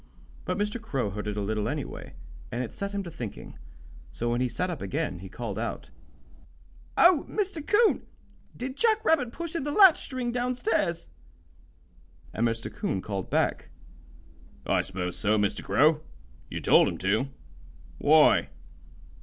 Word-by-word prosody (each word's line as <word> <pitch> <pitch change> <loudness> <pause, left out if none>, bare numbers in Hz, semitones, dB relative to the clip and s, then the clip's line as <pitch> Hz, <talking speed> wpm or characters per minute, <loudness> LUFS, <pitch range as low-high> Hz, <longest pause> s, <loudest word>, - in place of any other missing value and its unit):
But - - -1
Mr. 210 +3 -2
Crow 135 - -2
heard 105 +2 -5
it 105 0 -3
a - - 0
little, 105 +1 -1
anyway, - - -5 0.4
and 120 +2 -2
it 120 - -7
set 200 0 -4
him 200 -1 -3
to 170 - -8
thinking. 120 -10 -8 0.5
So 120 0 -2
when 120 +1 0
he 125 - +1
sat 180 +10 -2
up 165 - -6
again 150 - -2
he 95 +1 -9
called 110 -1 -5
out: 115 - -5 1.1
"Oh, 345 -4 +6
Mr. 385 -7 -2
'Coon, 435 +7 +3 0.5
did 260 +2 -5
Jack 445 -1 +2
Rabbit 265 - +3
push 335 +4 -6
in 330 - -1
the 290 - -2
latch 380 0 +7
string 255 -2 -3
down 250 +1 -1
stairs?" 210 -8 0 1.3
And 115 +2 +1
Mr. 115 0 -3
'Coon 95 - -2
called 100 -3 -4
back: - - 0 1.0
"I - - +2
s'pose 90 -2 -4
so, 105 +1 +2
Mr. 105 0 0
Crow. 155 +1 +3 0.5
You - - -5
told - - +5
him - - -3
to. 105 +8 +1 0.7
Why?" - - +5
160 Hz, 160 wpm, -27 LUFS, -, 1.3 s, latch